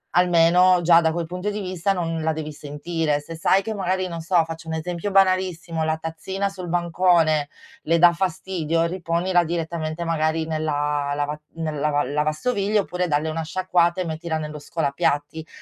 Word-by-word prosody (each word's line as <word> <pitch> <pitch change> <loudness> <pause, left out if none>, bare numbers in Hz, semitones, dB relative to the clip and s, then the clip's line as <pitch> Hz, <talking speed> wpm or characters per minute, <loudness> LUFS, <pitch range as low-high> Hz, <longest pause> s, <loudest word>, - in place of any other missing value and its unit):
almeno 180 +1 +5
già 170 0 +6
da 160 -1 +1
quel 170 0 -2
punto 180 +4 -4
di 210 0 -4
vista 185 0 -1
non 165 -3 -2
la 160 0 0
devi 155 -1 -5
sentire. 150 +1 -2
Se 165 +3 -9
sai 190 +4 +3
che 220 - -3
magari, 185 -2 -1
non 170 -1 -5
so, 170 0 +3
faccio 165 0 -8
un 160 - -3
esempio 170 +4 -3
banalissimo: 185 -4 +2
la 160 0 +1
tazzina 175 +5 -3
sul 185 -2 -8
bancone 170 -3 +2 0.4
le 165 +1 +2
dà 175 +1 +7
fastidio, 170 -2 -1
riponila 175 +1 0
direttamente 165 -1 -3
magari 160 -1 0
nella 145 -2 -1
lava 145 +1 -2 0.2
nella 155 -2 -2
va 145 0 +2
lavastoviglie 155 - 0
oppure 180 0 -2
dalle 155 0 0
una 160 +1 -3
sciacquata 175 +1 +1
e - - -2
mettila 160 0 -3
nello 150 -1 -6
scolapiatti. 145 +1 -2
165 Hz, 170 wpm, -23 LUFS, 155-180 Hz, 0.4 s, dà